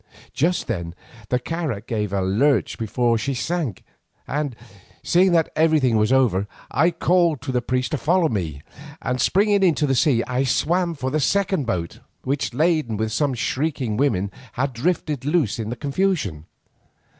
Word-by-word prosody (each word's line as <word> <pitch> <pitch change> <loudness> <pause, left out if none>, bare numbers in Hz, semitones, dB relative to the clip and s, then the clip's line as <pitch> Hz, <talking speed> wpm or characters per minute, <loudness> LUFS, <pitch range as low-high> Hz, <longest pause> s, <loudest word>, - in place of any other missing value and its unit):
Just 170 +7 +1
then 85 -6 -4 0.3
the 125 - +2
carak 135 -6 -4
gave 105 -4 -2
a 100 -1 0
lurch 130 +12 +1
before 115 +1 +1
she 135 +3 -2
sank, 155 - -2 0.4
and, 145 -4 -2 0.5
seeing 185 +2 +4
that 165 -2 +2
everything 155 -7 +3
was 110 +2 +2
over, 110 -7 +3 0.2
I 165 +4 +3
called 170 -2 +2
to 135 - -3
the 125 -1 0
priest 125 +3 -1
to 150 - -1
follow 175 +1 +2
me, 80 - -3 0.4
and 125 +1 -2
springing 200 +4 +3
into 165 -5 +3
the 135 - +1
sea 125 -3 +3
I 125 +1 0
swam 170 +6 +1
for 130 -2 -3
the 155 - +1
second 190 - +1
boat, 85 -7 -3 0.2
which, 140 +2 -1
laden 155 -5 +1
with 110 +1 -1
some 135 +3 0
shrieking 130 -2 -1
women, 105 -7 +1 0.2
had 135 +1 -1
drifted 150 +1 -1
loose 145 - +1
in 110 -1 -3
the 120 - -3
confusion. 140 - -1
135 Hz, 165 wpm, -22 LUFS, 115-160 Hz, 0.5 s, seeing